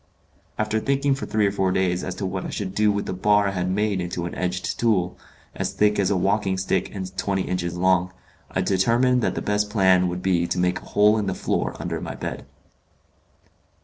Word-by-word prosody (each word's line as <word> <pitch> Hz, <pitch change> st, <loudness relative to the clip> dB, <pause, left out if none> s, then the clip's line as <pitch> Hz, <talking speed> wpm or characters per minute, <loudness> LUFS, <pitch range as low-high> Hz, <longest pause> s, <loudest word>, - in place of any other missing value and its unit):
After 110 Hz, 0 st, 0 dB
thinking 140 Hz, +3 st, +1 dB
for 135 Hz, -, -4 dB
three 110 Hz, -1 st, +1 dB
or 100 Hz, -, +2 dB
four 95 Hz, -2 st, 0 dB
days 90 Hz, -1 st, 0 dB
as 95 Hz, -, -4 dB
to 95 Hz, -, -4 dB
what 95 Hz, 0 st, -3 dB
I -, -, -5 dB
should 95 Hz, -2 st, -4 dB
do 105 Hz, 0 st, +3 dB
with 100 Hz, 0 st, -2 dB
the -, -, -3 dB
bar 105 Hz, +2 st, +3 dB
I -, -, -3 dB
had 90 Hz, -1 st, -2 dB
made 100 Hz, 0 st, 0 dB
into 85 Hz, 0 st, -3 dB
an 85 Hz, -, -5 dB
edged 90 Hz, 0 st, -3 dB
tool, 100 Hz, -6 st, +1 dB, 0.4 s
as -, -, -3 dB
thick 105 Hz, 0 st, +2 dB
as 95 Hz, -, +2 dB
a 100 Hz, -, +1 dB
walking 95 Hz, 0 st, +1 dB
stick 95 Hz, -, 0 dB
and 95 Hz, -1 st, -6 dB
twenty 95 Hz, -1 st, 0 dB
inches 85 Hz, -1 st, -3 dB
long, 90 Hz, 0 st, +2 dB, 0.4 s
I 95 Hz, -, -1 dB
determined 115 Hz, +7 st, +2 dB
that -, -, 0 dB
the -, -, -3 dB
best 105 Hz, 0 st, 0 dB
plan 95 Hz, -3 st, +4 dB
would 90 Hz, +1 st, -4 dB
be 85 Hz, -2 st, +2 dB
to -, -, -2 dB
make 90 Hz, 0 st, +1 dB
a -, -, -15 dB
hole 105 Hz, +1 st, +4 dB
in 105 Hz, -, -2 dB
the 95 Hz, -, -1 dB
floor -, -, -1 dB
under -, -, -3 dB
my -, -, -5 dB
bed. -, -, -6 dB
95 Hz, 220 wpm, -24 LUFS, 90-105 Hz, 0.4 s, plan